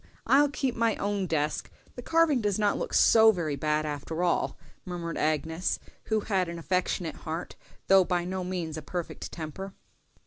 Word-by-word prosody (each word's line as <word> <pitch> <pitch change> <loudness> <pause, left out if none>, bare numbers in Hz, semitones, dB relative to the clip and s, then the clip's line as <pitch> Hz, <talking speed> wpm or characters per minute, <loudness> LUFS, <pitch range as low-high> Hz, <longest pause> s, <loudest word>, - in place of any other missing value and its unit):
I'll 285 +2 +5
keep 270 -3 -1
my 230 -1 +2
own 200 -2 -1
desk; 150 -2 -1 0.2
the 245 - -8
carving 325 -2 +3
does 205 -2 0
not 210 -1 +2
look - - -3
so 220 -1 +7
very 165 -7 -2
bad, 150 +2 0
after 150 +3 -3
all," 175 - +1 0.3
murmured 170 -2 -5
Agnes, 160 +3 0 0.3
who 220 -1 +1
had 190 -4 0
an 170 - -5
affectionate 180 -1 -1
heart, 160 +2 -5 0.3
though 195 -1 +6
by 175 -1 -1
no 185 +1 -3
means 175 -4 -3
a - - -5
perfect 175 +3 -5
temper. 180 +4 -7
180 Hz, 170 wpm, -28 LUFS, 160-205 Hz, 0.3 s, so